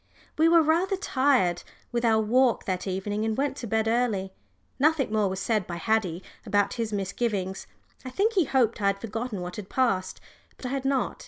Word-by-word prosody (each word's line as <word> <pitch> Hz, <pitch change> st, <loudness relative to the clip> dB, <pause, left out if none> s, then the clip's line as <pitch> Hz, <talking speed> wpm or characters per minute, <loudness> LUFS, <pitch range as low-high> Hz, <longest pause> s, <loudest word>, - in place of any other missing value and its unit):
We 320 Hz, +2 st, +4 dB
were 335 Hz, -1 st, +6 dB
rather 340 Hz, +5 st, +2 dB
tired 260 Hz, -, +2 dB, 0.3 s
with 235 Hz, 0 st, -1 dB
our 225 Hz, -2 st, +4 dB
walk 240 Hz, +2 st, +2 dB
that 185 Hz, 0 st, -2 dB
evening 205 Hz, +3 st, -2 dB
and 220 Hz, -1 st, -1 dB
went 280 Hz, 0 st, 0 dB
to 235 Hz, -, -5 dB
bed 220 Hz, +1 st, 0 dB
early. 225 Hz, -5 st, 0 dB, 0.5 s
Nothing 285 Hz, -5 st, +2 dB
more 210 Hz, -2 st, +2 dB
was 190 Hz, 0 st, -4 dB
said 215 Hz, -1 st, 0 dB
by 170 Hz, -, -4 dB
Haddie 190 Hz, -3 st, 0 dB, 0.2 s
about 205 Hz, -1 st, +1 dB
his 230 Hz, -3 st, -3 dB
misgivings. 195 Hz, -1 st, -2 dB, 0.4 s
I 260 Hz, -, -6 dB
think 410 Hz, -, +1 dB
he 370 Hz, -6 st, +3 dB
hoped 235 Hz, -5 st, +1 dB
I 200 Hz, -, +2 dB
had 200 Hz, 0 st, +1 dB
forgotten 225 Hz, -1 st, -4 dB
what 180 Hz, 0 st, -6 dB
had 205 Hz, -2 st, -7 dB
passed, 195 Hz, -8 st, 0 dB, 0.4 s
but -, -, -10 dB
I -, -, -2 dB
had 270 Hz, 0 st, -3 dB
not. 270 Hz, -1 st, 0 dB
225 Hz, 195 wpm, -26 LUFS, 195-260 Hz, 0.5 s, were